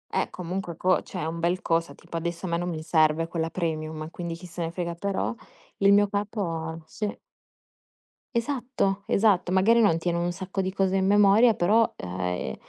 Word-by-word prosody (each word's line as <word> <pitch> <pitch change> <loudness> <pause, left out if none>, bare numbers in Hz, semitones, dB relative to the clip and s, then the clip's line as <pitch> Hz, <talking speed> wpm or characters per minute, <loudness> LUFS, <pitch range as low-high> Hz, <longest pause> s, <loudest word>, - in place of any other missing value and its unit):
Eh, - - +1
comunque 180 -1 -5
co 185 +1 +2
cioè 180 - -6
è - - -2
un 165 +1 -4
bel 175 +2 +1
cosa, 165 +1 0
tipo 170 -1 -7
adesso 170 +2 -4
a - - -3
me 170 - +1
non 175 +1 -2
mi 160 -2 -4
serve 160 0 +3
quella 165 -1 -2
premium, 155 -2 -3
quindi 170 -1 -5
chi 175 +2 -11
se 175 0 -7
ne 165 - -1
frega. 170 0 -3
Però 195 +6 -2 0.4
il 200 0 +4
mio 205 0 +5
capo, 170 -6 -3
sì. 205 +5 -4 1.2
Esatto, 235 -5 -1
esatto, 195 -4 +2
magari 200 +5 +4
non 200 -8 +4
tiene 170 0 -1
un 175 +1 0
sacco 190 +2 -4
di 190 0 -3
cose 195 -1 +1
in 190 -1 +2
memoria, 205 +4 +6
però, 210 +5 +4
ah, 90 0 -5
ehm, 90 -7 -3
175 Hz, 195 wpm, -26 LUFS, 165-195 Hz, 1.2 s, memoria